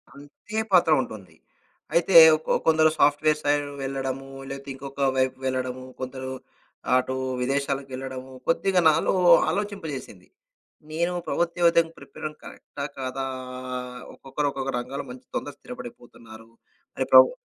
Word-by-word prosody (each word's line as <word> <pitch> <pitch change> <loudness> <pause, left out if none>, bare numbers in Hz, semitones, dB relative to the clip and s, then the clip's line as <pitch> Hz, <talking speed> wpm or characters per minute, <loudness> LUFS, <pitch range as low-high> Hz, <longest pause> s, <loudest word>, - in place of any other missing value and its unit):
అంతే 145 +9 -10
పాత్ర 170 -3 +5
ఉంటుంది. 95 -9 -9 0.6
అయితే 170 +1 +2 0.3
కొ - - -1
కొందరు 155 -1 +5
సాఫ్ట్‌వేర్ 150 +1 +3
సైడ్ 145 0 +2 0.2
వెళ్ళడము, 135 0 -3 0.2
లేతే 140 0 -7
ఇంకొక 140 +1 -2
వైపు 130 0 +1
వెళ్ళడము, 130 0 -2 0.2
కొందరు 130 0 -5 0.7
అటు 130 +1 -1 0.3
విదేశాలకెళ్ళడము, 135 -1 -3 0.2
కొద్దిగా 180 +2 +2
నాలో 155 - +2 0.4
ఆలోచింపజేసింది. 160 - -5 0.6
నేను 170 +3 0 0.2
ప్రభుత్వ 170 0 0
ఉద్యోగానికి 170 -1 +3
ప్రిపేరవ్వడం 155 0 -8
కరెక్టా 140 0 -8
కాదా! 130 +1 -3 0.9
ఒక్కొక్కరు 145 +2 -3
ఒక్కొక్క 135 0 -3
రంగాాల్లో 135 +3 -5
మంచి 125 0 -12
తొందరగ 145 - -4
స్థిరపడిపోతున్నారు. 115 -2 -11 0.5
మరి - - -1
ప్రబు - - +9
135 Hz, 115 wpm, -25 LUFS, 130-155 Hz, 0.9 s, ప్రబు